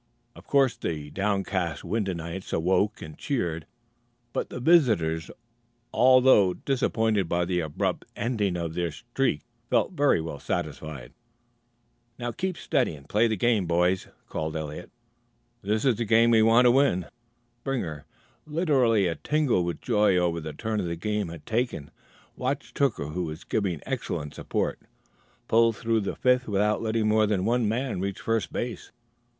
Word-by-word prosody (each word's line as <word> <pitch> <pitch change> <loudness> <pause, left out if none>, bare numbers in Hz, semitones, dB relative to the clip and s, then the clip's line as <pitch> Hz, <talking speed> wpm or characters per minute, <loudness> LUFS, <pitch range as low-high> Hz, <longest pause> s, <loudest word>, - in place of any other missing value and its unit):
Of - - -15
course 135 -3 +3
the 75 -3 -4
downcast 95 -5 -1
Wyndhamites 95 -2 -3
awoke 95 +5 +1
and 75 0 -9
cheered, 85 - -2 0.7
but - - -2
the - - -6
visitors, 110 - +3 0.6
although 130 -7 +5
disappointed 110 -8 0
by 85 0 +1
the 90 0 0
abrupt 80 -3 -2
ending 105 -7 -1
of 85 -2 -3
their 85 -1 -1
"streak," 120 - -1 0.3
felt - - +2
very 145 - +3
well 80 -3 -5
satisfied. 70 -6 -5 1.0
"Now 120 -1 -3
keep 185 +8 -3
steady 125 - 0
and 70 -1 -15
play 110 +7 +3
the 110 - 0
game, 110 -3 +2
boys," 90 +2 +1 0.2
called 80 0 -4
Eliot. 75 -1 -5 0.7
"This 105 +5 -1
is 125 -6 +3
the 115 - -1
game 115 +2 +4
we 110 -1 +5
want 115 +3 +5
to 120 - +7
win." 120 - +3 0.6
Springer, 85 - -3 0.4
literally 135 - +2
a 85 - +1
tingle 145 - +1
with 85 0 -4
joy 105 -5 +3
over 85 -2 +1
the 80 0 -5
turn 110 +4 -2
the 85 -1 -3
game 105 +2 -2
had 80 -3 -9
taken, 110 - -2 0.4
watched 135 +2 -3
Hooker, 125 - +1
who 90 +3 -3
was 80 0 -7
given 95 -8 -2
excellent 75 0 -3
support, - - -2 0.7
pull 115 +1 +4
through 115 0 0
the 100 - -3
fifth 125 0 +2
without 105 +1 +1
letting 110 -1 0
more 110 0 +3
than 100 -3 0
one 115 -1 +2
man 125 -2 -2
reach 100 0 -3
first 115 -1 -1
base. 120 -1 -5
105 Hz, 155 wpm, -26 LUFS, 85-120 Hz, 1.0 s, to